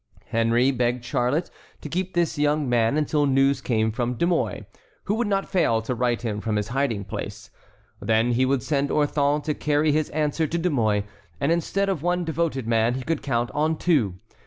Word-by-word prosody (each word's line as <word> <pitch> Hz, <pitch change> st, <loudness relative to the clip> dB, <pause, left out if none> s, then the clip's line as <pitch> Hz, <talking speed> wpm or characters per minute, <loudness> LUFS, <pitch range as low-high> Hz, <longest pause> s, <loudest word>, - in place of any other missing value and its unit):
Henry 115 Hz, +3 st, +2 dB
begged 125 Hz, -1 st, -1 dB
Charlotte 125 Hz, +6 st, 0 dB, 0.3 s
to -, -, -6 dB
keep 180 Hz, +3 st, -3 dB
the 175 Hz, -, +4 dB, 0.2 s
young 150 Hz, -1 st, +1 dB
man 120 Hz, +2 st, +2 dB
until 150 Hz, -1 st, +1 dB
news 135 Hz, 0 st, +3 dB
came 110 Hz, -3 st, +1 dB
from 120 Hz, +2 st, -2 dB
De 170 Hz, -, +1 dB
Mouy, 175 Hz, -1 st, -1 dB, 0.4 s
who 200 Hz, -, -1 dB
would 230 Hz, +1 st, 0 dB
not 195 Hz, -1 st, 0 dB
fail 165 Hz, -, +2 dB
to 125 Hz, -, -2 dB
write 120 Hz, 0 st, 0 dB
him 105 Hz, -3 st, -2 dB
from 110 Hz, -1 st, -1 dB
his 105 Hz, +1 st, -1 dB
hiding 120 Hz, -6 st, -1 dB
place. 95 Hz, -, -7 dB, 0.5 s
Then 110 Hz, +3 st, +2 dB
he 125 Hz, +2 st, +2 dB
would 130 Hz, -2 st, +1 dB
send 140 Hz, 0 st, 0 dB
Orthon 145 Hz, 0 st, +1 dB
to 150 Hz, -, -1 dB
carry 150 Hz, +1 st, +1 dB
his 155 Hz, 0 st, 0 dB
answer 155 Hz, +1 st, 0 dB
to 170 Hz, -, -2 dB
De 175 Hz, +1 st, 0 dB
Mouy, 110 Hz, -6 st, +1 dB, 0.4 s
and -, -, +1 dB
instead 180 Hz, +4 st, 0 dB
of 190 Hz, -7 st, -1 dB
one 175 Hz, +1 st, 0 dB
devoted 160 Hz, -5 st, -1 dB
man 115 Hz, +1 st, +2 dB
he 130 Hz, -, -4 dB
could 160 Hz, +2 st, -2 dB
count 120 Hz, -4 st, -1 dB
on 155 Hz, +2 st, +1 dB
two. 135 Hz, -, +1 dB
140 Hz, 200 wpm, -24 LUFS, 120-155 Hz, 0.5 s, the